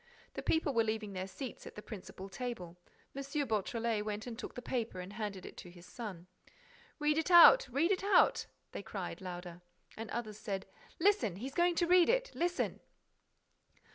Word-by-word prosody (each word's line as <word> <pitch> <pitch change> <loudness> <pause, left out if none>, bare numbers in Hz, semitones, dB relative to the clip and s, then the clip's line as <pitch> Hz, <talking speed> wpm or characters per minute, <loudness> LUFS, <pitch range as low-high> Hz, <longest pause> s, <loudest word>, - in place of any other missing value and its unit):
The - - -5
people 320 -3 +1
were 230 -2 +4
leaving 220 -2 -3
their 185 0 -4
seats 255 +5 -7
at - - -11
the 210 - -7
principal 195 -2 -8
table. 195 -6 -5 0.4
M. 275 - -3 0.2
Beautrelet 225 0 -1
went 210 0 -4
and 240 -2 -6
took - - -7
the 245 - -5
paper 230 -7 -2
and 180 +2 -7
handed 205 -3 -5
it - - -9
to 180 - -9
his 175 0 -14
son. 190 -5 -7 0.7
"Read 300 0 +2
it 320 - -1
out! 360 +8 +9
Read 290 +9 +2
it 385 -1 0
out!" 400 0 +4 0.2
they - - -5
cried, - - -6
louder. 175 -1 -7 0.3
And 225 0 -6
others 215 -3 -4
said: 195 -3 -4 0.3
"Listen! 375 - +3
He's 255 +8 -6
going 345 +1 +3
to 345 - +2
read 355 0 +5
it! - - +2
Listen!" 350 +1 -1
225 Hz, 180 wpm, -34 LUFS, 195-320 Hz, 0.7 s, out